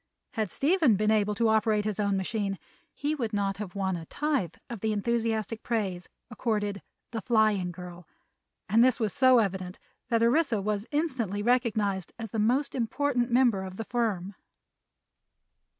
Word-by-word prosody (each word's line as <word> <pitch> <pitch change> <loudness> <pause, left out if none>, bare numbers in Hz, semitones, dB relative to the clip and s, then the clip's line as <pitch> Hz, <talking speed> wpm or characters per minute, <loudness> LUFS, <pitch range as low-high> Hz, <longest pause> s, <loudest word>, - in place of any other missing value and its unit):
Had 215 -4 -2
Stephen 300 - +3
been 215 +2 +2
able 210 -1 +2
to 230 +1 +2
operate 215 -1 +2
his 215 -1 -2
own 200 -1 +1
machine 195 0 -2 0.3
he 290 +2 -2
would 235 -7 -3
not 200 -1 0
have 205 -3 -6
won 190 -2 -1
a 165 -2 -7
tithe 285 - -1
of 235 -3 -6
the 220 +2 0
enthusiastic 225 0 -1
praise 195 -7 -2 0.2
accorded 210 -4 -2 0.3
"The 225 -2 -3
Flying 215 -5 +2
Girl," 175 -1 -10 0.6
and 225 +4 +5
this 255 0 +3
was 215 -4 0
so 255 -1 +5
evident 190 -4 -1 0.3
that 230 -1 +2
Orissa 245 -1 +3
was 205 +2 -2
instantly 255 - -1
recognized 215 -6 +1
as 225 -3 -7
the 220 - -2
most 250 +7 +1
important 255 +1 0
member 240 -5 +3
of 190 0 -8
the 225 - -4
firm. 205 -6 -1
220 Hz, 160 wpm, -28 LUFS, 200-240 Hz, 0.6 s, and